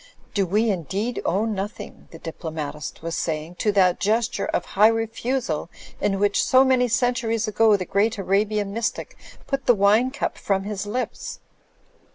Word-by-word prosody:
"... - - -31
do 195 -3 +1
we 215 +5 +2
indeed 195 - -2
owe 195 +5 +1
nothing," 210 -1 -5
the 165 - -11
diplo 165 0 -7
matist 150 -1 -6
was 165 0 -3
saying 155 +1 -3
"to 210 +4 0
that 185 -3 +3
gesture 220 +3 0
of - - -1
high 210 +3 +4
refusal 225 - -1 0.3
in 195 -1 0
which 200 +1 +2
so 260 +1 +5
many 255 -1 +3
centuries 235 -2 0
ago 215 0 +4
the 185 - -4
great 215 +4 +1
Arabian 200 +1 0
mystic 230 +1 -3 0.3
put 275 -2 -3
the 245 - +6
wine 210 +5 +4
cup 275 - -3
from 195 -1 0
his 205 0 -4
lips? 240 +2 -4
210 Hz, 170 wpm, -23 LUFS, 190-230 Hz, 0.3 s, the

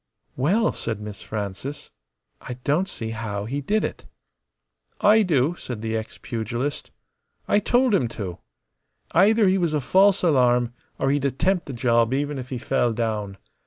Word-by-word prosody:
"Well!" 190 - +2
said 110 -3 -4
Miss 105 -1 -8
Frances. 105 +7 -5 0.5
"I 125 - -6
don't 165 +7 +1
see 110 -1 -5
how 105 -3 -4
he 140 +6 -3
did 210 +9 0
it." - - -4 0.9
"I 215 +2 +6
do," 155 -5 +2
said 115 -4 -6
the 110 0 -2
ex 110 0 -5
pugilist. 120 +4 -4 0.6
"I 205 - +4
told 245 +3 +2
him 155 -12 +3
to. 90 -5 -5 0.7
Either 215 +1 +5
he 190 +1 +3
was 170 -3 0
a 150 - +2
false 190 +8 +4
alarm, 125 -6 +3 0.2
or 135 - +1
he'd 145 -1 0
attempt 175 +7 0
the 140 - -5
job 120 0 +2
even 145 0 -2
if 125 0 -8
he 130 - -3
fell 120 -1 0
down. 105 -4 -2
130 Hz, 160 wpm, -24 LUFS, 115-175 Hz, 0.9 s, I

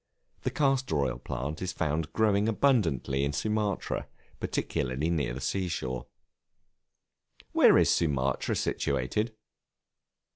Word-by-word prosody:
The - - 0
Castor 135 - +1
oil 65 -4 0
plant 70 +5 -4
is 95 - -2
found 75 +1 -1
growing 105 0 +2
abundantly 85 - +2
in 70 +1 0
Sumatra, 105 +5 -1 0.3
particularly 65 +6 -1
near 70 -7 0
the - - -5
sea 95 +5 -1
shore. 65 -7 -3 1.4
Where - - +6
is - - +4
Sumatra 70 -5 +1
situated? 70 - -1
80 Hz, 110 wpm, -29 LUFS, 65-105 Hz, 1.4 s, Where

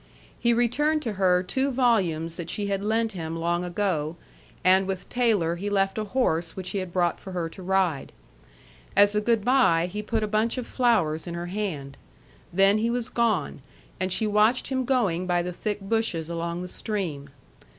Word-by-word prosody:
He 235 - +3
returned 295 +7 +1
to 225 - -2
her 185 -2 +3
two 265 +9 0
volumes 190 -11 +1
that 170 -1 -6
she 205 +3 -2
had 200 0 -2
lent 225 +1 +1
him 165 -3 -5
long 170 +1 -1
ago 175 -4 -1 0.5
and 190 +1 +4
with 190 -2 -4
Taylor 210 -9 +1
he 200 +4 -3
left 195 +1 +1
a 215 - -2
horse 175 -8 0
which 185 -1 -5
he 200 - -1
had 185 -2 -5
brought 175 -1 +1
for 190 - -9
her 175 -2 -2
to 185 - -11
ride. 185 -6 0 0.8
As 205 +1 +6
a 210 - +1
good 225 -1 +1
by, 245 -11 +4
he 210 +4 -4
put 220 +1 -1
a - - 0
bunch 215 +4 0
of 250 - -3
flowers 175 -14 +1
in 170 - -4
her 170 0 -4
hand. 155 -10 -4 0.5
Then 195 +3 +4
he 230 +2 +1
was 245 0 -1
gone, 220 - 0 0.4
and 185 0 -1
she 220 - +1
watched 215 +4 +2
him 260 -1 -1
going 200 -9 +1
by 175 -1 +1
the 180 0 -4
thick 210 +3 -3
bushes 195 -6 -1
along 170 +1 -3
the - - -5
stream. 175 -9 -3
195 Hz, 190 wpm, -26 LUFS, 175-225 Hz, 0.8 s, As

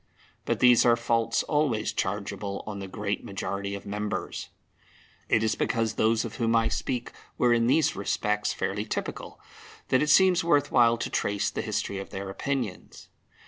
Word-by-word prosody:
But - - -1
these 125 -2 +6
are 120 -1 +5
faults 115 0 0
always 145 -8 0
chargeable 100 0 -3
on 105 -2 -6
the 95 - -6
great 105 +1 -3
majority 100 0 -4
of 100 - -9
members. 105 +1 -4 0.8
It 110 - +3
is 110 - +2
because 115 -2 0
those 110 +1 +2
of 115 - -7
whom 115 -2 +1
I 115 0 +3
speak 125 +1 -3 0.3
were 120 -1 +4
in 115 0 +2
these 155 +5 +3
respects 105 +1 -1
fairly 105 +2 -2
typical, - - -5 0.5
that 130 - +3
it 150 - +1
seems 185 +2 +5
worth 145 -4 +2
while 120 -2 +5
to - - -3
trace 100 0 0
the - - -3
history 100 - -2
of 95 - -7
their 95 0 -5
opinions. 125 -2 -4
110 Hz, 170 wpm, -27 LUFS, 100-120 Hz, 0.8 s, these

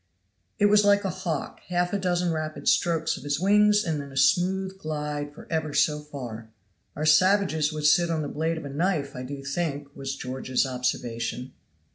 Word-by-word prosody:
It 205 - +3
was 210 0 +5
like 205 0 +4
a 190 - 0
hawk 160 -5 -4
half 175 0 0
a 200 - +1
dozen 180 -2 0
rapid 155 -1 -4
strokes 165 -2 +2
of - - -11
his 145 0 -1
wings 210 +2 +4
and 160 -5 -2
then 140 -1 -9
a 135 - -8
smooth 190 +7 +2
glide 150 -2 -4
for - - -11
ever 160 -2 -1
so 150 +1 +3
far. 125 -7 -8 0.5
"Our 155 - -2
savages 160 -1 +4
would 155 -1 -4
sit 170 +3 +4
on 160 -2 -1
the - - -3
blade 160 +3 -2
of 160 - -7
a - - -5
knife, 145 -2 -1
I 125 - -5
do 135 +2 -7
think," 145 -1 -3
was 135 0 -4
George's 130 +1 -1
observation. 125 -1 -3
155 Hz, 190 wpm, -26 LUFS, 140-175 Hz, 0.5 s, was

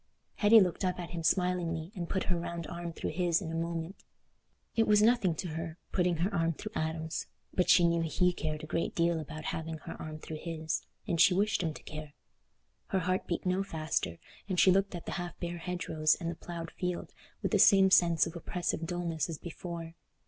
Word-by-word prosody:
Hetty 220 +2 +7
looked 185 -1 +1
up 180 -1 0
at 175 - -6
him 170 -1 -4
smilingly 170 -1 +1
and 175 -5 -5
put 190 - 0
her 180 -2 0
round 170 -1 -4
arm 170 +1 -5
through - - -4
his 170 0 +2
in 165 -5 -5
a - - -3
moment. 165 +2 -3 0.7
It 225 - +3
was 210 0 +6
nothing 215 -6 +4
to 180 - -4
her, 165 +1 -5
putting 180 -2 +2
her 185 +6 0
arm 165 -2 +2
through 215 +7 -7
Adam's, 160 -2 -2 0.3
but 180 -1 +1
she 175 - +7
knew 170 0 +2
he 180 +2 +2
cared 155 -3 -3
a - - -3
great 165 +2 -2
deal 170 -1 +2
about 155 0 -7
having 160 0 -4
her - - -8
arm 155 0 -6
through 155 0 -7
his, 160 -2 -2 0.3
and 170 -2 +2
she 180 - +6
wished 205 +1 +2
him 160 -3 -2
to - - -11
care. 150 -1 -8 0.7
Her 190 - 0
heart 185 +2 0
beat 170 - -2
no 185 +1 +2
faster, 155 - -2 0.3
and 185 -2 +1
she 190 - +7
looked 195 0 +2
at 170 - -7
the - - -4
half 175 0 -7
bare 175 0 -4
hedgerows 160 -3 +1
and 170 -2 -2
the - - -6
ploughed 165 -1 -7
field 180 -1 -4 0.3
with - - 0
the - - +3
same 195 -2 +7
sense 170 -3 +5
of 165 0 -6
oppressive 170 -1 -2
dulness 170 -3 -2
as 160 - -4
before. 170 0 -7
170 Hz, 215 wpm, -31 LUFS, 160-180 Hz, 0.7 s, Hetty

